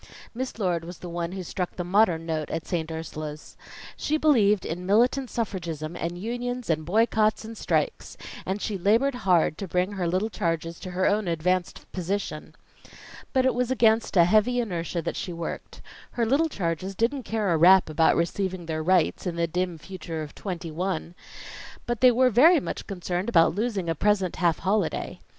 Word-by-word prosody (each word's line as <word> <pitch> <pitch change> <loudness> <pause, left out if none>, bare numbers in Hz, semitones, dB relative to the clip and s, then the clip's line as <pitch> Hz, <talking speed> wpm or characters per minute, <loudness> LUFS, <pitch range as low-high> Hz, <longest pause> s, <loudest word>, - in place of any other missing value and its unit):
Miss 255 +1 -4
Lord 180 -6 0
was 175 +1 -8
the 180 - -8
one 170 +1 -3
who 190 -1 -5
struck 180 +1 -4
the 180 - -3
modern 175 -3 +2
note 155 -2 -2
at 165 0 -4
St. 165 -3 -2
Ursula's. 155 -1 -7 0.4
She 310 - 0
believed 215 -11 +3
in 180 +3 -4
militant 245 +5 +3
suffragism 170 -8 -4
and 170 +1 -4
unions 245 +2 -3
and 155 0 0
boycotts 215 +3 +2
and 225 +1 -8
strikes; - - -2 0.3
and 190 +2 -2
she 205 -3 -2
labored 230 +9 +3 0.2
hard 165 -3 +3
to 195 - -4
bring 180 +3 0
her 190 -4 -2
little 185 +6 0
charges 165 -1 -2
to 185 - -7
her 185 - +2
own 205 -1 +1
advanced 175 +2 -1
position. 195 +3 -4 0.8
But 260 -1 +2
it 260 - +3
was 250 0 -1
against 225 -4 +2
a 170 - +8
heavy 215 +6 +3
inertia 175 -6 -2
that - - -3
she 180 - -4
worked. 170 0 -7 0.3
Her 235 - 0
little 285 +8 +2
charges 185 - -3
didn't 245 +7 0
care 215 -5 -1
a - - +2
rap 185 +3 +6
about 160 +1 +3
receiving 185 +1 -1
their 160 -1 -3
rights, 180 +2 +2
in 175 - -2
the 170 0 +1
dim 175 +1 -2
future 165 -1 -6
of 150 - -9
twenty 175 -4 -5
one; 175 0 -3 0.7
but 240 -2 -3
they 255 - +8
were 250 +1 +3
very 310 - +6
much - - -6
concerned 185 +1 -3
about 165 -7 +4
losing 205 -3 -2
a 165 - +1
present 195 +1 +1
half 170 -1 +2
holiday. 210 +3 -1
185 Hz, 185 wpm, -26 LUFS, 170-220 Hz, 0.8 s, a